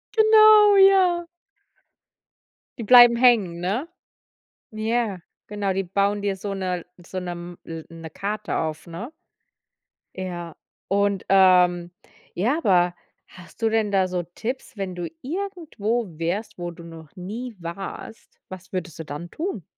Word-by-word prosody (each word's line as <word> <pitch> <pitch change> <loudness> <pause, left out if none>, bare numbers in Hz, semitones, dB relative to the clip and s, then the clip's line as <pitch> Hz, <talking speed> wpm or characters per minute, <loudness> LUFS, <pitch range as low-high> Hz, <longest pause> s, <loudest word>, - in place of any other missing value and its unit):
Genau. 430 -1 +7
Ja. 370 -3 +5 1.5
Die - - -3
bleiben 240 0 +8
hängen, 215 -9 +3
ne? 220 - -2 0.8
Ja, 220 -2 -1 0.3
genau, 205 -2 -2
die 195 +1 -1
bauen 200 +2 0
dir 200 -1 -1
so 200 +1 -5
'ne 180 -3 -3 0.2
so 185 - -6
'ne 180 -1 -4
m 175 0 -9
l 165 -1 -7
so 165 - -14
'ne 165 -1 -9
Karte 210 +4 -4
auf, 155 0 -3
ne? 200 - -8 1.0
Ja. 175 -3 -6 0.3
Und, 200 0 0
ähm, 180 -2 +4 0.4
ja 240 - 0
aber 180 - +2 0.3
hast 180 +4 -16
du 225 - +2
denn 220 -2 0
da 190 -1 +2
so 180 -1 -3
Tipps, 255 +1 -5
wenn 190 -2 -4
du 175 -1 -4
irgendwo 255 - -3
wärst, 180 +7 -3
wo 175 0 -5
du 170 0 -13
noch 160 -3 -13
nie 220 +6 -7
warst, 190 +5 -8
was 185 -1 -11
würdest 180 -3 -5
du - - -4
dann 155 +4 -7
tun? 320 - -4
195 Hz, 145 wpm, -23 LUFS, 175-235 Hz, 1.5 s, bleiben